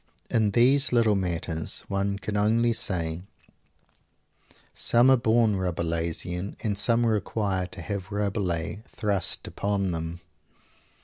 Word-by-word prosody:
In 110 -3 +2
these 130 +6 +3
little 115 -3 +3
matters 85 -4 -2
one 100 0 -1
can 105 +1 -5
only 115 +3 +2
say, 85 -6 0 1.5
"some 120 +3 +4
are - - +7
born 115 -3 +2
Rabelaisian, 85 +1 -2
and 105 -2 0
some 115 +3 +3
require 100 -3 -1
to 85 - -8
have 95 +3 -5
Rabelais 100 -3 -2
thrust 100 -4 -1
upon 100 -2 -1
them!" 80 0 -4
100 Hz, 115 wpm, -26 LUFS, 90-110 Hz, 1.5 s, are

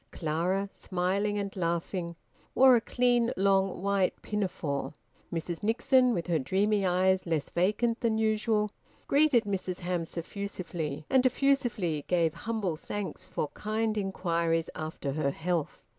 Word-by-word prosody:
Clara, 175 +5 -1
smiling 195 +3 -1
and 200 -1 -3
laughing, 170 0 -2 0.4
wore 260 -1 +7
a 235 - +3
clean 245 0 +2
long 195 -1 +2
white 200 -2 +1
pinafore. 180 -9 -2 0.4
Mrs 170 0 -3
Nixon, 250 +4 +3
with 170 - -2
her 170 -3 +1
dreamy 195 +7 +1
eyes 185 +1 +2
less 160 -4 -1
vacant 215 +7 +1
than 225 -3 +1
usual, 215 -1 +1 0.3
greeted 280 -5 +4
Mrs 190 -3 -3
Hamps 175 -1 -3
effusively, 170 -5 -4
and 260 -1 +4
effusively 245 - +1
gave 170 -3 +2 0.2
humble 205 -7 -1
thanks 205 +4 -5
for 150 - -2
kind 215 +1 -2
inquiries 170 -5 0
after 155 -3 -4
her 140 0 0
health. 165 +1 -2
190 Hz, 130 wpm, -29 LUFS, 170-215 Hz, 0.4 s, wore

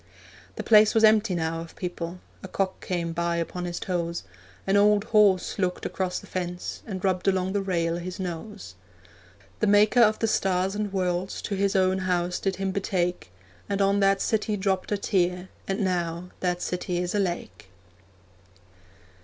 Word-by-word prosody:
The - - -4
place 215 -1 +6
was 225 - +4
empty 215 -3 +5
now 165 0 -2
of 165 - -11
people; 175 -1 -5 0.2
A - - -7
cock 190 0 -2
came 170 -2 -2
by 170 0 0
upon 175 +1 -3
his 175 -1 -4
toes; 170 -2 -2 0.4
An 195 - +2
old 205 0 +5
horse 210 -5 +3
looked 180 -2 -1
across 185 -1 -2
the - - -8
fence, 180 -1 -4
And 190 -3 -4
rubbed 185 0 0
along 190 0 +1
the 200 - +1
rail 170 -3 0
his 180 +2 -6
nose. 185 - -6 0.9
The 215 - +2
maker 210 +4 +5
of 215 -1 +5
the - - 0
stars 190 -2 +1
and 210 -1 -2
worlds 185 -1 -1
To - - -3
His 200 +1 0
own 190 0 +3
house 180 -1 0
did 195 -1 -1
Him 195 0 -2
betake, 180 - -2 0.4
And 200 0 -1
on 200 0 +3
that 195 0 +3
city 215 -1 0
dropped 190 0 -1
a 205 - +2
tear, 180 -2 0 0.2
And 195 +3 -1
now 175 -2 -2
that 180 -1 -1
city 180 0 -2
is 175 0 -2
a 205 - +1
lake. 105 - -3
185 Hz, 175 wpm, -26 LUFS, 175-200 Hz, 0.9 s, place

